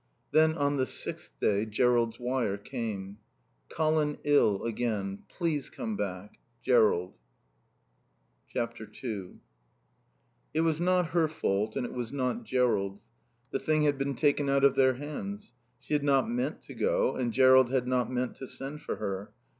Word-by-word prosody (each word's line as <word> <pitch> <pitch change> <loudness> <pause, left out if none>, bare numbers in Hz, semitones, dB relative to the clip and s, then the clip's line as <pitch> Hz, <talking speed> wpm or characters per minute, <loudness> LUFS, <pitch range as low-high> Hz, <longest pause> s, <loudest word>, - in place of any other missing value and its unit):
Then 160 0 +4
on 145 0 +1
the 130 -1 +1
sixth - - -5
day 100 0 +2
Jerrold's 115 +1 +1
wire 125 -5 -1
came: 105 -4 -5 0.5
"Colin 155 -2 +1
ill 145 -9 +3
again. 105 -4 -2
Please 160 -6 -2
come 110 -2 -4
back. 100 0 -5 0.2
Jerrold." 110 -8 +3 1.4
ii 110 -3 -4 1.3
It 160 - +3
was 165 -1 +1
not 180 -1 +2
her 165 -2 +3
fault 110 -8 -1
and 130 - -1
it - - -6
was 120 -2 -4
not 140 - -2
Jerrold's. 105 - 0 0.4
The 135 - -1
thing 155 -1 +1
had 145 -2 +2
been 135 0 -1
taken 145 +1 +2
out 140 0 +2
of 140 -2 +6
their 130 -1 +4
hands. 155 - -6 0.3
She 145 - -6
had 145 -1 +2
not 140 +2 +3
meant 245 +2 -2
to - - -10
go - - +1
and 120 -2 -1
Jerrold 130 0 +6
had 130 -1 0
not 125 -1 +1
meant 125 0 -1
to 130 - -7
send 140 +4 -4
for - - -3
her. 100 -1 -4
130 Hz, 155 wpm, -29 LUFS, 110-145 Hz, 1.4 s, of